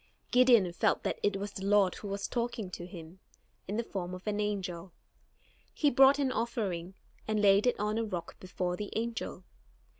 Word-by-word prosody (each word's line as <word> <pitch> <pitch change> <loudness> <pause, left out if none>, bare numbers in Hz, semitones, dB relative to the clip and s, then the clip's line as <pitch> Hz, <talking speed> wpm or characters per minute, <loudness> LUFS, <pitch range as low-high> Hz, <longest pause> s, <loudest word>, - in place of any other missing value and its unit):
Gideon 240 -8 +5
felt - - +1
that - - -2
it 205 -1 +1
was 200 +1 -5
the 195 - -7
Lord 200 -2 +4
who 205 - -8
was 200 0 -3
talking 235 -5 -3
with 175 +1 -8
him, 170 0 -11 0.5
in 205 +3 -3
the 235 - 0
form 185 -4 -5
of 185 - -11
an 210 -1 -1
angel. 190 -4 -3 0.8
He 295 -2 +3
brought 270 +2 +6
an 275 -2 +1
offering, 195 -8 -2 0.3
and 215 -1 0
laid 205 +2 +5
it 245 - +1
on 210 +2 0
a - - 0
rock 180 -6 -5
before 180 -1 -3
the 205 +2 -5
angel. 225 -5 -3
205 Hz, 185 wpm, -31 LUFS, 185-230 Hz, 0.8 s, brought